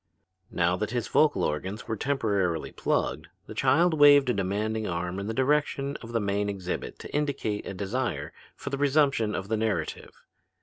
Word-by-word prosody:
Now 85 +1 +1
that 105 +1 -2
his 120 -1 -2
vocal 155 -1 +3
organs 95 +8 -3
were 110 - -1
temporarily 100 - 0
plugged, - - -1 0.2
the - - -9
child 170 +3 +3
waved 145 -3 +6
a - - 0
demanding 105 +3 -1
arm 90 +2 -3
in 100 - -4
the - - -1
direction 140 +2 0
of 115 - -10
the 115 - +1
main 100 0 0
exhibit 95 -3 -4
to - - -9
indicate 140 -8 -1
a 95 - -5
desire 105 +5 -3 0.2
for - - -7
the 140 - -2
resumption 140 -6 +2
of 95 - -4
the 110 +1 0
narrative. 110 -1 -3
110 Hz, 175 wpm, -27 LUFS, 100-140 Hz, 0.2 s, waved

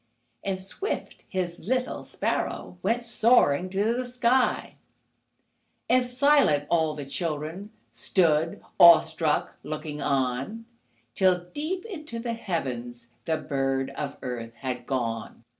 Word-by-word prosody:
And 195 -1 -2
swift, 195 - -5
His 180 -3 -2
little 255 +1 -1
sparrow 180 - -3
Went 230 +5 0
soaring 220 - +4
to 205 +4 +1
the 250 +1 -1
sky, 250 +1 +1 1.1
And 255 0 +4
silent, 250 - +3
all 160 -3 +2
the 145 -2 -6
children 160 +6 -4 0.2
Stood, 160 +6 +1 0.2
awestruck, 160 -2 +5
looking 150 -1 -5
on, 135 - -1 0.5
Till, 180 +1 +3
deep 355 +6 -3
into 310 - -7
the 230 0 -3
heavens, 125 - -4 0.2
The 160 -1 +1
bird 135 -2 -1
of 140 0 -5
earth 115 -2 -5
had 125 -2 -5
gone. 115 -4 -3
170 Hz, 115 wpm, -27 LUFS, 140-230 Hz, 1.1 s, awestruck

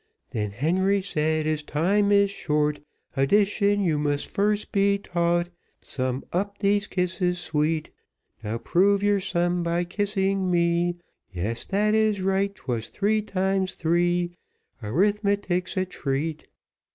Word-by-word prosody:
Then 105 -2 -2
Harry 185 - +1
said, 155 -3 0
"As 155 -1 0
time 195 +8 +1
is 200 -1 +4
short, 150 -5 0 0.4
Addition 205 +7 +2
you 160 -5 +1
must 145 -1 0
first 210 +1 -1
be 200 0 +3
taught; 175 -2 0 0.3
Sum 130 0 -3
up 200 +3 -1
these 205 0 +1
kisses 180 -1 0
sweet; 155 -2 -1 0.5
"Now 110 +2 -2
prove 195 - +2
your 205 -1 +3
sum 175 -1 0
by 170 +1 0
kissing 195 0 -1
me: 170 0 +1 0.3
Yes, 100 +6 -3
that 210 +2 +2
is 215 -2 +2
right, 195 +1 0
'twas 115 -8 -4
three 215 - 0
times 190 -2 -1
three 175 +1 +1 0.5
Arithmetic's 195 - 0
a 185 - +2
treat. 155 -2 -3
180 Hz, 125 wpm, -25 LUFS, 155-200 Hz, 0.5 s, is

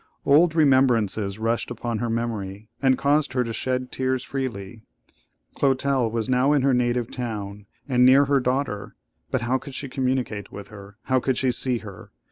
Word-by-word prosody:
Old 160 +3 +5
remembrances 120 - +2
rushed 115 +1 -1
upon 120 -1 -4
her 120 - -2
memory, 110 -3 -3
and 130 -2 +3
caused 145 0 +1
her 125 -1 +1
to 115 -1 -5
shed 130 +2 -2
tears 130 -1 -1
freely. 115 -6 -5 0.7
Clotel 135 -3 +1
was 115 -1 -2
now 130 +3 +3
in 140 -3 +2
her 135 -1 +3
native 120 -1 0
town, 105 -4 -5 0.2
and 125 -2 +3
near 135 +3 +6
her 140 0 +2
daughter; 125 -5 -2 0.3
but 130 - -1
how 125 +3 0
could 135 -1 -10
she 140 - -5
communicate 125 -6 -2
with 100 0 -9
her? 100 -1 -12
How 130 0 +2
could 130 0 -1
she 130 -1 +2
see 125 0 0
her? 95 -3 -11
125 Hz, 175 wpm, -24 LUFS, 110-130 Hz, 0.7 s, near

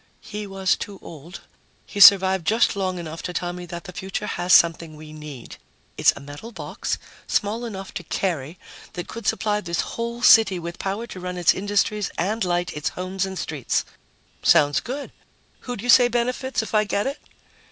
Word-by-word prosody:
"He 210 -1 -6
was 195 -1 +1
too 200 -1 -7
old. 165 +4 -10 0.4
He 205 - -7
survived 190 -4 +7
just 225 0 +3
long 185 -2 -1
enough 165 -1 -6
to 180 - -5
tell 175 0 -2
me 180 0 -8
that 170 0 -7
the 190 - -9
future 190 +2 -4
has 180 -3 -2
something 165 -2 +4
we 155 0 -11
need. 150 -5 -10 0.4
It's - - +5
a - - -9
metal 145 +11 -10
box, - - -4 0.3
small 220 +4 0
enough 195 -4 -7
to 175 - -5
carry, 165 -3 -2 0.4
that 175 -1 -6
could 230 -2 -7
supply 210 -1 +1
this 170 -3 -1
whole 235 +1 -5
city 215 -6 +7
with 170 0 -7
power 200 +4 -3
to 190 - -9
run 180 0 -5
its 175 - +4
industries 205 +1 0
and 210 +6 0
light 175 -1 -1
its 150 0 -1
homes 185 +1 -3
and 190 0 -6
streets!" 145 -8 -2 0.6
"Sounds 145 -1 +4
good. 275 +4 -6 0.6
Who'd 245 -4 -4
you 245 - -4
say 245 +1 +8
benefits 245 +1 -1
if 220 - -9
I 215 -1 +4
get 205 0 -1
it?" 280 +2 -3
190 Hz, 185 wpm, -23 LUFS, 170-215 Hz, 0.6 s, say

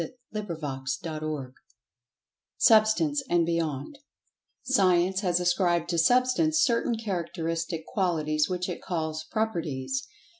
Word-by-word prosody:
[Pg 210 -1 -4
76] 135 -6 -4
CHAPTER 155 -2 -4
VI 145 -4 -3 1.1
SUBSTANCE 225 +7 +4
AND 170 -1 +3
BEYOND 165 - -2 0.6
SCIENCE 190 -7 +3
has 180 -3 +1
ascribed 175 -1 +1
to 170 -1 +1
Substance 255 - +3
certain 240 -5 +2
characteristic 165 -5 -3
qualities 155 -5 0
which 180 0 -2
it 180 - -5
calls 160 -3 -3
"Properties." 215 - -2
175 Hz, 110 wpm, -27 LUFS, 160-215 Hz, 1.1 s, SUBSTANCE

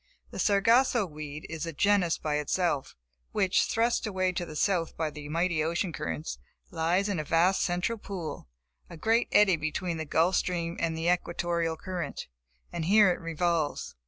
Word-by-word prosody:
The - - -7
Sargasso 230 +3 +3
weed 150 -2 -8
is 160 0 -5
a - - -3
genus 190 +1 +2
by 150 -1 -1
itself, 150 -2 -1 0.4
which, 190 -2 +2
thrust 230 0 +1
away 185 -2 0
to 175 -1 -4
the 155 - -8
south 170 -1 0
by 160 -2 -1
the 145 0 -9
mighty 165 0 +1
ocean 170 +2 -1
currents, 75 - -4 0.3
lies 175 +5 +1
in 200 -5 -1
a - - -1
vast 170 +5 +2
central 180 +6 -1
pool, 170 - -6 0.4
a 170 - -9
great 225 +7 +2
eddy 205 -4 +5
between 165 +3 -3
the 160 - -4
Gulf 165 +5 +2
Stream 170 -2 -1
and 165 -1 -1
the 165 +1 -2
Equatorial 170 -2 0
current; 180 0 -5 0.5
and 160 - -2
here 205 +1 +6
it - - -3
revolves. 165 -1 -1
170 Hz, 170 wpm, -28 LUFS, 160-190 Hz, 0.5 s, here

